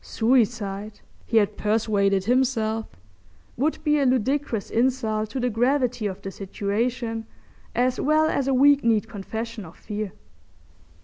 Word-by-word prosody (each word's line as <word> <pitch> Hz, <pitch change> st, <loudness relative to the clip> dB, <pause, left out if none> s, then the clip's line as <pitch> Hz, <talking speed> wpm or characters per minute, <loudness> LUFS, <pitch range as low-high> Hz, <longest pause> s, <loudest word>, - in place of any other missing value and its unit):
Suicide, 215 Hz, -4 st, 0 dB, 0.3 s
he 225 Hz, -, +2 dB
had 210 Hz, -1 st, +2 dB
persuaded 205 Hz, -3 st, +1 dB
himself, 225 Hz, -2 st, +1 dB, 0.7 s
would 295 Hz, +6 st, 0 dB
be 300 Hz, -1 st, +3 dB
a -, -, +2 dB
ludicrous 255 Hz, -2 st, 0 dB
insult 225 Hz, -3 st, 0 dB
to 260 Hz, -, -4 dB
the 250 Hz, 0 st, 0 dB
gravity 245 Hz, -1 st, +1 dB
of 190 Hz, -2 st, -5 dB
the 195 Hz, -, -5 dB
situation 225 Hz, +4 st, -3 dB, 0.5 s
as 250 Hz, +1 st, +1 dB
well 310 Hz, +2 st, +3 dB
as 280 Hz, -4 st, 0 dB
a 270 Hz, -, +2 dB
weak 285 Hz, +2 st, +5 dB
kneed 225 Hz, -1 st, +2 dB
confession 225 Hz, +1 st, -6 dB
of 165 Hz, -2 st, -13 dB
fear. 210 Hz, -2 st, -5 dB
225 Hz, 135 wpm, -24 LUFS, 210-255 Hz, 0.7 s, weak